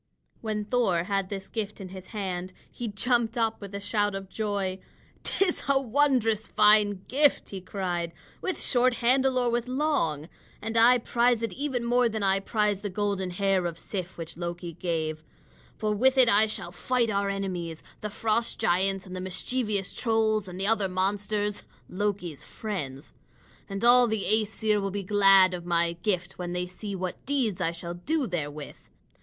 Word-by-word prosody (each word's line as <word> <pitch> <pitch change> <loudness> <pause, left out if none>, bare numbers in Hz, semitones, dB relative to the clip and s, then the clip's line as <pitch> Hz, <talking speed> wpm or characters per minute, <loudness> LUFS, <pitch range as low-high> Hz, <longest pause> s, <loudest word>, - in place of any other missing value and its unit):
When 215 -2 -2
Thor 205 -7 +1
had 195 0 -1
this 195 -1 -5
gift 210 -2 -4
in 190 -2 -7
his 190 0 -10
hand, 185 -4 -4 0.2
he 240 - -5
jumped 235 +2 +1
up 225 -1 0
with 200 0 -8
a - - -3
shout 205 0 0
of 195 -1 -6
joy. 200 -3 -2 0.4
"'Tis 375 -2 +1
a 275 -1 +5
wondrous 245 -4 +2
fine 210 -2 +4
gift," 285 +2 +2
he 195 -2 -5
cried, 180 -3 -3 0.3
"with 375 - -2
short 250 -1 +2
handle 260 +2 +2
or 245 -1 +2
with 240 +1 -1
long. 255 - 0 0.3
And 225 +2 -5
I 235 +2 +7
prize 235 0 +1
it 230 - -2
even 265 -4 -2
more 245 0 +3
than 220 -2 -3
I 195 0 +3
prize 210 -1 0
the 205 - -3
golden 195 -1 -1
hair 190 0 +1
of 170 -1 -6
Sif 185 0 -5
which 165 -1 -7
Loki 175 0 -5
gave. 160 -2 -2 0.5
For 215 0 0
with 260 +5 +3
it 255 -2 +7
I 215 0 +5
shall 175 -4 -5
fight 235 +5 0
our 200 0 0
enemies, 180 -5 -4 0.2
the 210 - -3
Frost 225 +2 0
Giants 190 +2 +1
and 185 -1 -8
the 185 - -4
mischievous 200 +2 -2
Trolls 220 -3 +1
and 180 0 -8
the 195 - 0
other 210 -2 +2
monsters 205 +2 0 0.3
Loki's 190 -6 -3
friends. 150 -10 -6 0.6
And 195 +3 -2
all 245 0 +7
the 220 -2 -1
Æsir 215 0 +1
will 195 - -1
be 200 +1 -4
glad 195 -1 +6
of 175 -1 -5
my 170 -1 +2
gift 185 -4 -1
when 175 -1 -4
they 180 0 -1
see 195 +3 -6
what 185 -1 -5
deeds 255 -9 0
I 165 - +1
shall 170 0 -6
do 285 - -1
therewith. 150 - -5
205 Hz, 175 wpm, -27 LUFS, 185-230 Hz, 0.6 s, I